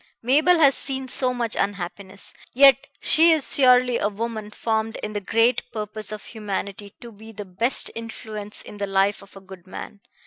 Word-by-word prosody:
Mabel 305 +8 +4
has 280 -4 +5
seen 265 0 -1
so 255 0 +2
much 235 -2 -3
unhappiness, 195 0 -4 0.2
yet 270 0 +5
she 330 +2 +5
is 315 -4 +1
surely 250 -2 +4
a 205 - 0
woman 215 0 -5
formed 220 +1 -2
in 210 - -4
the 205 - -3
great 230 +5 +1
purpose 215 -1 -6
of 215 0 -8
humanity 200 -2 -6
to 235 - -10
be 220 +1 -13
the 205 -1 -8
best 225 +8 0
influence 215 -2 -7
in 205 - -12
the 200 - -2
life 195 +1 +1
of 195 0 -17
a - - -12
good 190 -1 -14
man. 200 +2 -9
220 Hz, 180 wpm, -23 LUFS, 205-250 Hz, 0.2 s, has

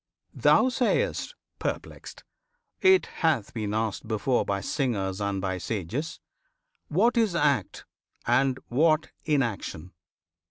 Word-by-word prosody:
Thou 260 - +4
sayst, 370 - 0 0.2
perplexed, - - -5 0.6
It 380 0 +5 0.2
hath 145 - +1
been 110 -3 -3
asked 110 0 -2
before 115 +3 +1
By 100 0 -1
singers 100 -5 -2
and 100 -1 -1
by 95 -1 -2
sages, 110 - -4 0.7
"What 225 +10 +2
is 220 -6 +2
act, 140 - 0 0.4
And 130 +2 +2
what 155 +4 +2
inaction? 115 - -2
125 Hz, 110 wpm, -27 LUFS, 100-160 Hz, 0.7 s, It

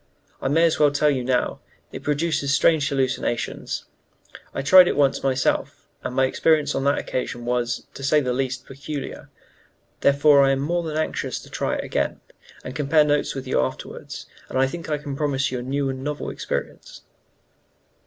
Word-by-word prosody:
I - - -1
may 160 +5 +3
as 165 -1 +3
well 150 -1 +6
tell 145 +1 +2
you 130 -3 -1
now, 125 0 0 0.3
it - - -7
produces 150 -1 0
strange 145 0 +3
hallucinations. 130 -3 -2 0.7
I - - -4
tried 180 +5 +8
it - - 0
once 140 -2 +3
myself, 130 -1 0 0.2
and 125 - -4
my 130 0 +4
experience 150 +2 +2
on 135 - -1
that 140 +1 +3
occasion 120 -1 -3
was, 120 0 -1
to 135 - -9
say 150 +3 +4
the 125 -3 -1
least, 130 0 -2
peculiar; 140 +1 -7 0.7
therefore 140 0 +5
I 135 0 +4
am 135 - -1
more 170 +5 0
than 155 -2 -4
anxious 155 - -2
to - - -15
try - - -1
it - - -3
again, - - -1 0.4
and 130 - -7
compare 150 +1 +3
notes 145 -1 0
with 135 -1 -5
you 130 - +1
afterwards, 65 - -5 0.2
and - - -3
I 135 - +4
think 165 +5 -6
I 150 - +1
can 145 -1 -6
promise 140 -2 0
you 125 - -2
a - - -5
new 135 +2 -1
and 130 0 -4
novel 150 +1 -3
experience." - - -5
140 Hz, 185 wpm, -23 LUFS, 130-150 Hz, 0.7 s, tried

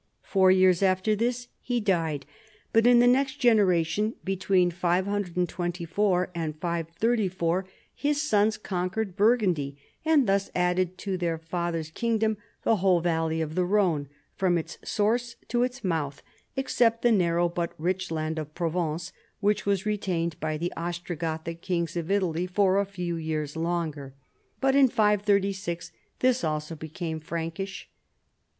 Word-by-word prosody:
Four 190 -2 +3
years 185 -1 +5
after 190 +2 +2
this 240 +3 -1
he 245 -1 -1
died, 165 -9 0 0.5
but 225 +1 +5
in 245 0 +7
the 240 - +6
next 265 +2 +3
generation, 210 - +2
between 185 -1 +2
524 180 0 0
and 160 -3 -4
534, 175 +2 0 0.3
his 290 0 0
sons 215 -7 +2
con 185 -3 -2
quered 195 -1 -3
Burgundy, 185 - +2 0.3
and 310 -4 +4
thus 195 -1 +1
added 180 0 +1
to 190 -1 -3
their 170 -2 0
father's 165 -1 -3
kingdom 220 +2 0 0.3
the 225 - +3
whole 185 -2 +3
valley 160 -1 0
of 155 -1 -3
the 180 +2 +1
Rhone 180 -7 +1 0.3
from 180 -2 +1
its 160 0 -6
source 235 +3 0
to 240 - +1
its 250 +2 -2
mouth, 155 -6 -2 0.3
except 235 -4 +1
the 240 - +5
narrow 175 -4 +3
but 170 0 -3
rich 185 +3 -1
land 160 0 -2
of 155 0 -7
Provence, 170 0 -2 0.3
which 210 -1 +1
was 200 -1 +1
retained 180 -6 -1
by 155 0 -2
the 175 +3 -3
Ostrogoth 170 -2 -4
ic 165 0 -5
kings 170 -3 -2
of 170 0 -3
Italy 180 -3 +1
for 190 +1 +3
a 200 - 0
few 180 -3 -4
years 155 -2 -3
longer, 160 -5 -3 0.4
but 270 0 +2
in 275 -1 +7
536 200 -5 +1 0.3
this 255 0 +3
also 155 +1 -2
became 160 +1 -5
Prankish. 165 +5 -5
180 Hz, 145 wpm, -27 LUFS, 165-210 Hz, 0.5 s, in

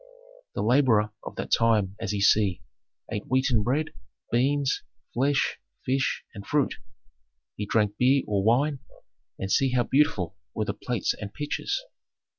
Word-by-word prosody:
"The - - -1
laborer 115 -3 +3
of - - -8
that - - -5
time, 105 -4 +3
as 115 -3 -2
ye 105 -1 -2
see, 100 -2 +3 0.5
ate 105 -2 -4
wheaten 130 -3 +2
bread, 140 +8 0 0.4
beans, 135 +3 +2 0.3
flesh, 140 +3 +1 0.3
fish, 130 +1 0
and 100 - -8
fruit; 145 +4 +1 0.8
he 105 - -4
drank 105 -1 +1
beer 130 +2 +4
or 100 -2 0
wine, 135 +6 +2 0.6
and 95 0 -4
see 135 +3 +3
how 125 -1 +3
beautiful 100 - +1 0.2
were 110 - 0
the - - -2
plates 120 -3 -1
and 105 -1 -7
pitchers. 145 - -2
120 Hz, 145 wpm, -26 LUFS, 105-135 Hz, 0.8 s, beer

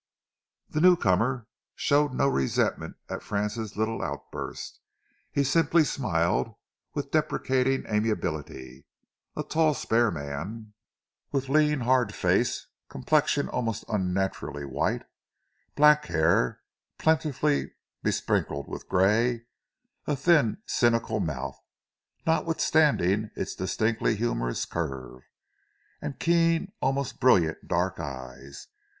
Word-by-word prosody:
The 155 - -2
newcomer 125 - +3 0.3
showed 145 0 +2
no 130 - +1
resentment 70 - 0
at - - -5
Francis' 105 +1 -3
little 110 +1 -1
outburst. - - -6 0.5
He 140 - +1
simply 160 +4 +3
smiled 105 - 0 0.4
with - - -3
deprecating 130 0 +1
amiability 80 - -3 0.5
a - - -2
tall, 155 -2 +2
spare 115 0 +2
man, 85 +8 -6 0.6
with 135 -2 -1
lean, 150 -1 +3
hard 120 -4 +2
face, - - +1 0.2
complexion 65 - +1
almost 115 -3 -3
unnaturally 95 -7 -2
white; 65 - -1 0.7
black 150 0 +6
hair, 80 -6 +1 0.4
plentifully 150 -2 +1 0.3
besprinkled 70 0 -1
with - - -8
grey; 115 +6 +2 0.6
a 145 - +1
thin, 150 - +2
cynical 115 -3 +1
mouth, 70 -7 -3 0.7
notwithstanding 150 - +2
its - - -3
distinctly 110 0 0
humourous - - -1
curve, 65 -6 -5 0.8
and - - -5
keen, 165 +2 +2
almost 135 0 -1
brilliant 90 -11 +3
dark 90 +2 0
eyes. 70 -2 -8
115 Hz, 100 wpm, -27 LUFS, 85-140 Hz, 0.8 s, black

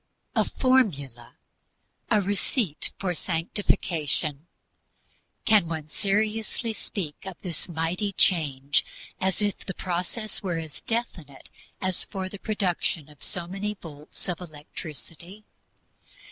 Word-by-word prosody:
A - - +5
formula, 145 - +2 0.7
a 210 - +5
receipt 200 - 0
for 185 -2 0
Sanctification 165 -3 0 1.0
can 210 -6 +6
one 160 -2 -3
seriously 215 +5 +1
speak 180 -7 -4
of 190 -2 -6
this 175 -1 -3
mighty 170 +5 0
change 145 -8 +4 0.4
as 190 +2 +2
if 205 -1 +1
the 190 - -4
process 185 +5 -1
were 180 -5 0
as 160 -3 -5
definite 180 - -3 0.3
as 185 -1 +1
for 190 -1 -3
the 200 - -8
production 180 -7 0
of 150 -3 -16
so 175 -2 -3
many 195 +4 -2
volts 150 -3 -7
of 180 -1 -1
electricity? 170 +4 -9
180 Hz, 115 wpm, -28 LUFS, 155-205 Hz, 1.0 s, can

